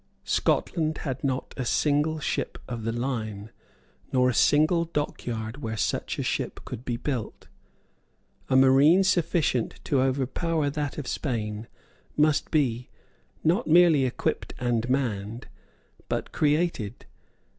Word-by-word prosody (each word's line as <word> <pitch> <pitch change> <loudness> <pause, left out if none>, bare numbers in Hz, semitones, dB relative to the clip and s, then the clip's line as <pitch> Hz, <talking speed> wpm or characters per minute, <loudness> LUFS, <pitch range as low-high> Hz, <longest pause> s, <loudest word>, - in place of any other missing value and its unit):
Scotland 160 -3 0
had 130 -2 -3
not 130 -2 -2
a 130 - -1
single 150 +5 +1
ship - - -2
of 115 -3 -5
the 115 - 0
line, 110 -4 -3 0.6
nor 125 -1 +3
a - - 0
single 155 +7 +3
dockyard 125 -6 -4
where 110 -3 -4
such - - -1
a - - -2
ship - - -2
could 115 - -7
be 120 -2 -2
built. 125 -3 -4 1.0
A 130 - +2
marine 135 +8 +6
sufficient 170 - +1
to 135 -3 +1
overpower 140 +4 0
that 145 -1 -3
of 150 - -4
Spain 110 -6 -3 0.5
must 150 0 +2
be, 125 -6 0 0.5
not 175 +9 +2
merely 165 -3 +6
equipped 125 - -2
and 120 -1 0
manned, 115 -4 -1 0.6
but - - -2
created. 150 - 0
135 Hz, 125 wpm, -26 LUFS, 120-155 Hz, 1.0 s, marine